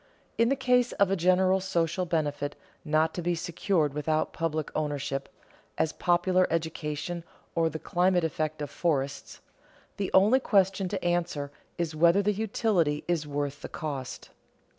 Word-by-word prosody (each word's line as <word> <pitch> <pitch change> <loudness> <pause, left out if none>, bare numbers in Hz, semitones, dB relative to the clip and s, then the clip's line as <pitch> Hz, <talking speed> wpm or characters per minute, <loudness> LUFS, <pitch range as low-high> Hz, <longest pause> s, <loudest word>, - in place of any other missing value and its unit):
In 230 0 +4
the 275 - +3
case 250 -2 +2
of 200 -1 +2
a - - +3
general 185 +1 +3
social 180 -1 0
benefit 145 -3 -1 0.3
not 155 +1 +2
to 175 - -4
be 175 +1 0
secured 165 -2 0
without 155 +1 -1
public 155 -2 -2
ownership, 145 -2 -2 0.5
as 160 - +1
popular 180 +1 +2
education 160 0 -3 0.3
or 165 -1 +2
the 160 - -5
climatic 180 +2 +1
effect 155 +1 -2
of 145 - -6
forests, 145 -5 -2 0.6
the 195 -2 -1
only 210 +7 +5
question 195 -5 +2
to 195 -2 -4
answer 170 -5 -1 0.3
is 170 -2 -2
whether 170 +5 +4
the 210 +1 +2
utility 195 -7 0
is 165 -4 0
worth 145 0 -3
the - - -7
cost. 140 -5 -6
170 Hz, 150 wpm, -28 LUFS, 150-185 Hz, 0.6 s, only